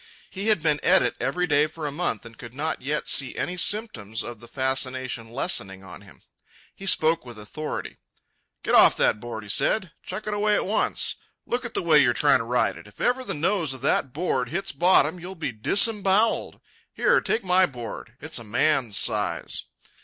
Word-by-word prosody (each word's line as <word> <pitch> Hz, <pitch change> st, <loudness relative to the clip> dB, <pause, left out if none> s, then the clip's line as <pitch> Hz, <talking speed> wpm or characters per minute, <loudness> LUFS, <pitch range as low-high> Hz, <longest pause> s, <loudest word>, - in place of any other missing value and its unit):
He 200 Hz, +2 st, -3 dB
had 210 Hz, -8 st, +3 dB
been 150 Hz, -2 st, +2 dB
at 190 Hz, +1 st, +4 dB
it -, -, -1 dB
every 180 Hz, 0 st, 0 dB
day 150 Hz, -2 st, +3 dB
for 155 Hz, 0 st, -8 dB
a 145 Hz, -, -2 dB
month 145 Hz, -8 st, -2 dB
and 115 Hz, -1 st, -12 dB
could 120 Hz, +1 st, -11 dB
not 155 Hz, +3 st, -2 dB
yet 150 Hz, +4 st, -2 dB
see 135 Hz, -3 st, +1 dB
any 180 Hz, -, -3 dB
symptoms 150 Hz, -, -2 dB
of 120 Hz, -2 st, -8 dB
the 120 Hz, -, -13 dB
fascination 130 Hz, -2 st, -2 dB
lessening 100 Hz, -, -2 dB
on 90 Hz, -2 st, -11 dB
him. -, -, -18 dB, 0.5 s
He 195 Hz, -, -9 dB
spoke 160 Hz, -2 st, +3 dB
with 120 Hz, -3 st, -11 dB
authority. 150 Hz, +9 st, -6 dB, 0.7 s
"Get -, -, -1 dB
off -, -, +7 dB
that -, -, +2 dB
board," 110 Hz, -1 st, -7 dB
he 105 Hz, -, -12 dB
said. 185 Hz, -, 0 dB
"Chuck 190 Hz, +4 st, -6 dB
it 215 Hz, -, -2 dB
away 210 Hz, 0 st, +2 dB
at -, -, 0 dB
once. 210 Hz, +3 st, 0 dB, 0.3 s
Look 245 Hz, +1 st, -2 dB
at 240 Hz, -, -7 dB
the -, -, -1 dB
way 160 Hz, -3 st, +5 dB
you're 120 Hz, -4 st, +4 dB
trying 145 Hz, -1 st, +4 dB
to 115 Hz, -, -4 dB
ride 115 Hz, -6 st, +1 dB
it. 85 Hz, -, -13 dB
If 105 Hz, -, -19 dB
ever 255 Hz, +1 st, +1 dB
the -, -, -4 dB
nose 165 Hz, -3 st, 0 dB
of 130 Hz, -, -10 dB
that 135 Hz, -1 st, +1 dB
board 135 Hz, -5 st, -1 dB
hits 195 Hz, +6 st, -3 dB
bottom, 170 Hz, +1 st, +3 dB
you'll 180 Hz, +3 st, -7 dB
be 160 Hz, -6 st, -3 dB
disembowelled. 200 Hz, -, +2 dB, 0.3 s
Here, -, -, +3 dB
take 225 Hz, -, -1 dB
my 185 Hz, 0 st, +4 dB
board. 120 Hz, -4 st, -8 dB
It's 160 Hz, -2 st, -4 dB
a -, -, -7 dB
man's 120 Hz, 0 st, +1 dB
size." -, -, 0 dB
150 Hz, 200 wpm, -25 LUFS, 120-185 Hz, 0.7 s, off